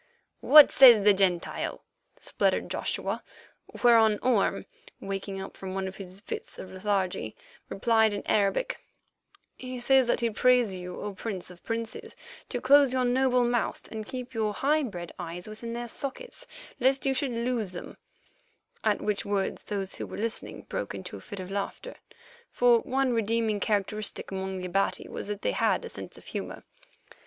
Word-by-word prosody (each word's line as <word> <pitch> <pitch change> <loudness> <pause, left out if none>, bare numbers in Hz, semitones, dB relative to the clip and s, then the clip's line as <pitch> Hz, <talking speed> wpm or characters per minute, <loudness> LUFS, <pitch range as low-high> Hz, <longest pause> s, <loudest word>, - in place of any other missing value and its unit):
"What 300 -1 +8
says 240 -6 +8
the 205 0 +7
Gentile?" 190 -3 0 0.4
spluttered - - 0
Joshua, - - -2 0.6
whereon 225 -3 +6
Orme, 245 -6 +2 0.3
waking 195 0 -5
up 190 - -7
from 190 -1 -6
one 190 0 -2
of 190 - -8
his 190 0 -9
fits - - -6
of 185 - -9
lethargy, 190 - -2 0.3
replied 220 +1 +3
in 205 - -5
Arabic: 205 - +1 0.8
"He 255 -1 -6
says 265 +1 +4
that - - +1
he 235 -1 +1
prays 245 -2 +3
you, 180 -1 -7
O 205 -1 -5
Prince 190 -2 -5
of 175 - -16
princes, 230 -1 -4 0.3
to 245 - -2
close 275 +1 +5
your 255 -1 +1
noble 250 0 +3
mouth 240 -1 -1
and 220 -1 -5
to - - -15
keep 255 -1 -6
your 215 -2 -1
high 300 +3 +2
bred 180 - -5
eyes 175 +1 -6
within 225 +2 -7
their 240 0 -4
sockets 280 - -6 0.3
lest 265 +2 +2
you 270 - +3
should 260 -1 -1
lose 235 -3 -1
them"; 175 - -8 0.9
at 215 -2 +1
which 210 -1 -1
words 200 -1 -2
those 195 -2 -3
who - - -5
were - - -8
listening 230 +2 -3
broke - - -4
into - - -7
a - - -9
fit 205 -3 -8
of 185 0 -7
laughter, 200 - -4 0.6
for 240 -1 +4
one 265 0 0
redeeming 225 -1 0
characteristic 210 0 -2
among 190 0 -3
the 185 - -5
Abati 195 +2 0
was - - -6
that 210 0 -5
they - - +1
had - - +1
a - - -7
sense - - -8
of - - -15
humour. - - -6
215 Hz, 170 wpm, -28 LUFS, 195-245 Hz, 0.9 s, What